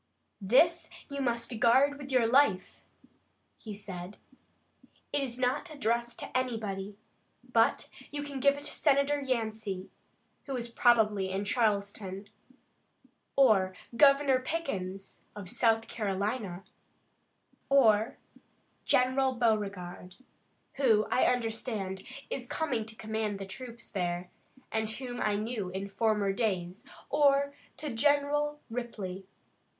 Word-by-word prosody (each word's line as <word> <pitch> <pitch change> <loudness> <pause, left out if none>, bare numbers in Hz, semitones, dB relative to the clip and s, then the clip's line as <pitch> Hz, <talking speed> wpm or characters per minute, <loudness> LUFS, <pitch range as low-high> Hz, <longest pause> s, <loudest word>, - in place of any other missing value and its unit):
"This 325 - +4 0.2
you 280 0 -4
must 235 -2 -1
guard 270 +6 +4
with 280 -1 -8
your 250 -3 +4
life," 230 -6 +2 0.8
he 215 -2 -7
said. 190 -1 -7 1.0
"It 290 - +2
is 250 -3 -4
not 255 +6 0
addressed 235 -3 -1
to - - -8
anybody, 210 -6 -2 0.5
but - - +2 0.2
you 290 0 -3
can 285 -2 -5
give 280 +2 +4
it 285 - -8
to 295 - -1
Senator 285 0 +2
Yancey, 220 -7 -3 0.6
who 270 - -3
is 235 -1 -4
probably 220 -5 +3
in 195 +2 -2
Charleston, 200 -3 -1 1.1
or 200 -8 +4 0.2
Governor 275 0 +5
Pickens, 195 - -4
of 200 -4 -7
South 225 -1 +2
Carolina, 200 -2 -2 1.1
or 225 -5 +4 0.7
General 260 +1 +3
Beauregard, 200 -6 -1 0.6
who, 225 -6 +4
I - - +4
understand, 225 -5 -1 0.3
is 250 -2 -3
coming 245 -7 -2
to 220 - -11
command 220 -2 -2
the 195 - -6
troops 235 +4 -8
there, 180 -2 -2 0.4
and 220 -1 0
whom 245 +2 -5
I 210 -1 +1
knew 215 -2 -3
in 190 +2 -4
former 210 -2 +1
days, 190 -4 -2 0.3
or 280 -1 +3 0.2
to 300 -5 -5
General 290 +3 +2
Ripley. 205 -6 -5
225 Hz, 115 wpm, -30 LUFS, 200-265 Hz, 1.1 s, Governor